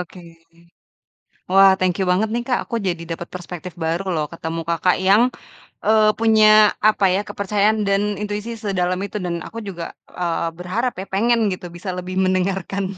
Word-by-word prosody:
oke. 180 +1 -9 1.3
Wah 195 +1 +7
thank 185 -1 +1
you 190 - +1
banget 205 +4 +2
nih 240 0 -1
Kak, 250 -2 +1
aku 235 - -4
jadi 175 -2 -2
dapet 170 +1 -5
perspektif 180 0 -7
baru 170 +4 -1
loh 155 -1 0
ketemu 165 0 -4
Kakak 170 +2 +2
yang, 205 +4 +6 0.6
eee, 215 0 +5
punya 220 -1 +4 0.4
apa 210 -2 +3
ya 190 - +1
kepercayaan 205 +2 +1
dan 200 0 +2 0.2
intuisi 210 +2 -4
sedalam 185 -4 -1
itu 210 - -6
dan 170 -1 -2
aku 230 - -11
juga, 175 -3 -6 0.4
eee, 170 -1 -1
berharap 220 +8 -2
ya, - - -7
pengen 235 +4 +2
gitu 180 - -8
bisa 185 +3 -6
lebih 180 +1 -5
mendengarkan 185 +1 -1
190 Hz, 165 wpm, -21 LUFS, 180-210 Hz, 1.3 s, Wah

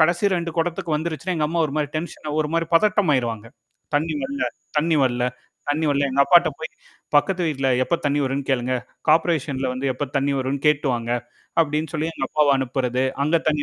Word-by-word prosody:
கடைசி 175 +5 +3
2 170 -1 -2
குடத்துக்கு 165 -1 -1
வந்துருச்சுன்னா. 165 +3 -3
எங்க 150 -1 +1
அம்மா 165 +1 +1
ஒரு 145 - -6
மாரி 145 -1 -1
டென்ஷனா 155 -2 -5
ஒரு 150 - -2
மாரி 165 -1 0
பதட்டம் 205 -3 +4
ஆயிருவாங்க. 115 -3 -1 0.5
தண்ணீ 155 +1 0
வர்ல, 140 +1 -3 0.4
தண்ணீ 160 +1 +2
வர்ல. 120 -1 0 0.5
தண்ணி 155 +2 0
வர்ல 140 0 +2
எங்க 135 +1 +1
அப்பாட்ட 175 -1 +6
போயி, 160 - -5 0.4
"பக்கத்து 180 +5 +3
வீட்டுல 135 -3 0
எப்ப 170 +6 +1
தண்ணீ 145 0 +1
வரும்னு 135 0 -2
கேளுங்க, 130 -1 +1 0.3
கார்பரேசன்ல 155 -4 +2
வந்து 130 +2 -3
எப்ப 140 +2 -4
தண்ணீ 140 +1 +1
வரும்னு 135 +2 -2
கேட்டு 150 -1 +3
வாங்க!" 120 0 -4 0.5
அப்டின்னு 155 0 0
சொல்லி 160 0 -1
எங்க - - -2
அப்பாவ 150 -1 +3
அனுப்புறது. 130 -1 -1 0.2
அங்க 160 +3 +3
தண்ணீ 150 -1 +1
150 Hz, 185 wpm, -22 LUFS, 135-165 Hz, 0.5 s, அப்பாட்ட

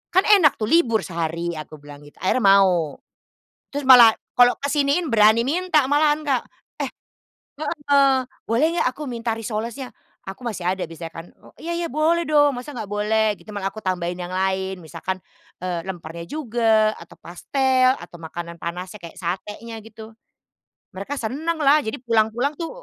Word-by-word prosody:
Kan 375 - +6
enak 395 -9 +5
tuh, - - -5
libur 230 - +3
sehari." 170 -1 -3
Aku 155 0 -9
bilang 145 -1 -13
gitu, - - -18
akhirnya 190 +7 +2 0.2
mau. 180 -6 +2 0.7
Terus 285 0 -5
malah, 245 -4 +8 0.2
kalau 245 0 +5
kesiniin 285 +2 +1
berani 220 +1 +5
minta 315 +1 +2
malahan, 300 +1 +3
Kak, 270 -4 +1 0.4
"Eh" - - -1 0.7
Heeh, 280 -3 +2 0.2
"Boleh 235 +7 +3
nggak 345 - +1
aku 300 - -5
minta 230 -3 -3
risolesnya?" 230 +3 -5 0.4
Aku 245 +6 -9
masih 215 -6 -4
ada 185 0 -1
biasanya 165 0 -8
kan, 165 - -7 0.3
"Iya 340 +1 -5
iya, 340 - -2
boleh 315 +5 +2
dong 290 -2 +4
masa 245 +3 -7
nggak 220 -3 -4
boleh?" 215 +1 +1
Gitu - - -18
malah 195 -1 -2
aku 215 - -9
tambahin 180 -2 -2
yang 175 0 -5
lain 190 +1 -1
misalkan, 170 +4 -5 0.5
eee, 180 -2 -2
lempernya 170 -2 -7
juga, 225 -6 +2
atau 170 - -14
pastel 260 +8 +1
atau 175 - -12
makanan 170 +1 -8
panasnya 180 +4 -6
kayak 170 -1 -11
satenya, 210 +6 -5
gitu. 220 0 -12 0.8
Mereka 200 +10 -5
senanglah, 295 +4 +1
jadi 220 -6 -4
pulang-pulang 230 +3 +1
tuh 330 - -3
225 Hz, 160 wpm, -22 LUFS, 185-280 Hz, 0.8 s, malah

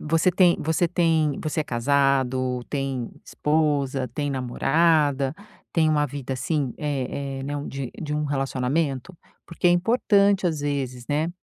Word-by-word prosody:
você 165 +4 +2
tem 180 -1 +4
você 160 +3 +1
tem 160 -4 +1
você 155 +1 -1
é 150 - -1
casado, 130 -1 +1
tem 135 -4 -3
esposa, 145 -4 0
tem 145 +4 -3
namorada, 140 +2 +2 0.4
tem 160 -2 +3
uma 150 -1 +2
vida, 135 -1 -5
assim, 135 0 -1
eh 140 -1 -3
eh, - - -5
né, 145 +2 -4
de 135 -3 -5
de 150 -1 -3
um 150 0 -1
relacionamento? 135 +3 -1 0.3
Porque 170 +1 -2
é - - +6
importante, 200 0 +3
às 160 -3 -1
vezes, 130 -4 -3
né. 160 +5 -1
145 Hz, 145 wpm, -24 LUFS, 135-160 Hz, 0.4 s, é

